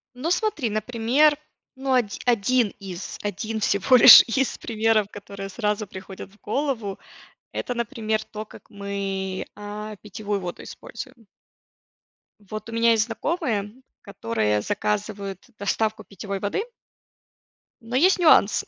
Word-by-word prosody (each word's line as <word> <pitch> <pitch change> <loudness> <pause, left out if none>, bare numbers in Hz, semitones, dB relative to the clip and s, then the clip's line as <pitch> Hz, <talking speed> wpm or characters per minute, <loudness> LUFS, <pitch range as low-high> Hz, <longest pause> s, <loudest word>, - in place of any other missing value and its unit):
Ну, 295 +7 -2
смотри, 360 - 0
например, 240 +7 +2 0.4
ну 265 0 -1
оди 240 -6 +1
один 240 -1 +2
из 190 -2 -7
один 215 +2 -3
всего 200 +4 +3
лишь 245 - +12
из 265 +3 -1
примеров, 220 -2 +1
которые 200 -1 -8
сразу 210 0 -2
приходят 190 0 -9
в 210 - -23
голову- 230 -5 -2 0.5
это, 245 - -3
например, 225 -2 -2
то, 215 0 -8
как - - -16
мы, 195 -2 -4
а, 210 +1 -7
питьевую 205 +1 -4
воду 180 -2 -6
используем. 255 -4 -10 1.1
Вот 215 +2 -8
у - - -7
меня 230 0 +3
есть 220 -1 +3
знакомые, 225 - -2 0.3
которые 115 - -1
заказывают 205 - -3
доставку 215 +2 -1
питьевой 200 0 -6
воды. 205 - -1 1.2
Но 230 +2 -6
есть 365 +8 +4
нюанс: 310 - +5
215 Hz, 125 wpm, -24 LUFS, 200-240 Hz, 1.2 s, лишь